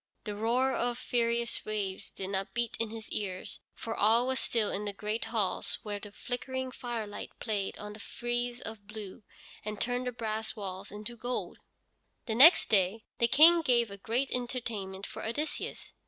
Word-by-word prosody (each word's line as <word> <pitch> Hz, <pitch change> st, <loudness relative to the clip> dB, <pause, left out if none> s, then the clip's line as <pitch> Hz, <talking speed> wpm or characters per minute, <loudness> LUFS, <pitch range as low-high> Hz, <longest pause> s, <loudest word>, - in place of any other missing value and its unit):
The 210 Hz, -, -4 dB
roar 245 Hz, +5 st, +2 dB
of 240 Hz, 0 st, 0 dB
furious 235 Hz, -1 st, 0 dB
waves 205 Hz, -3 st, -2 dB
did 190 Hz, 0 st, -5 dB
not 195 Hz, 0 st, -2 dB
beat 235 Hz, -1 st, 0 dB
in 230 Hz, -1 st, +1 dB
his 220 Hz, 0 st, -7 dB
ears, 185 Hz, -3 st, -3 dB, 0.2 s
for 225 Hz, -, -4 dB
all 225 Hz, +4 st, +5 dB
was 260 Hz, 0 st, +1 dB
still 225 Hz, -3 st, +1 dB
in 205 Hz, +2 st, -2 dB
the 205 Hz, -, -2 dB
great 210 Hz, +3 st, -2 dB
halls 215 Hz, -5 st, +1 dB
where 205 Hz, -1 st, -3 dB
the 205 Hz, 0 st, -9 dB
flickering 260 Hz, +3 st, -3 dB
firelight 230 Hz, -5 st, -5 dB
played 205 Hz, -4 st, -1 dB
on 210 Hz, 0 st, -7 dB
the 215 Hz, -, -11 dB
frieze 240 Hz, +2 st, -2 dB
of 215 Hz, -2 st, -8 dB
blue, 210 Hz, 0 st, -7 dB, 0.4 s
and 210 Hz, -1 st, -4 dB
turned 245 Hz, +1 st, 0 dB
the -, -, 0 dB
brass 220 Hz, -2 st, -3 dB
walls 195 Hz, -2 st, -5 dB
into 210 Hz, +3 st, -7 dB
gold. 245 Hz, +2 st, -3 dB, 0.7 s
Next 260 Hz, +10 st, +8 dB
day 205 Hz, +2 st, +3 dB, 0.2 s
the 235 Hz, -, +5 dB
King 325 Hz, +7 st, +8 dB
gave 240 Hz, -7 st, +3 dB
a 200 Hz, -, -7 dB
great 235 Hz, +7 st, -1 dB
entertainment 225 Hz, -6 st, -3 dB
for -, -, -7 dB
Odysseus. 290 Hz, +8 st, -3 dB
225 Hz, 170 wpm, -31 LUFS, 205-245 Hz, 0.7 s, Next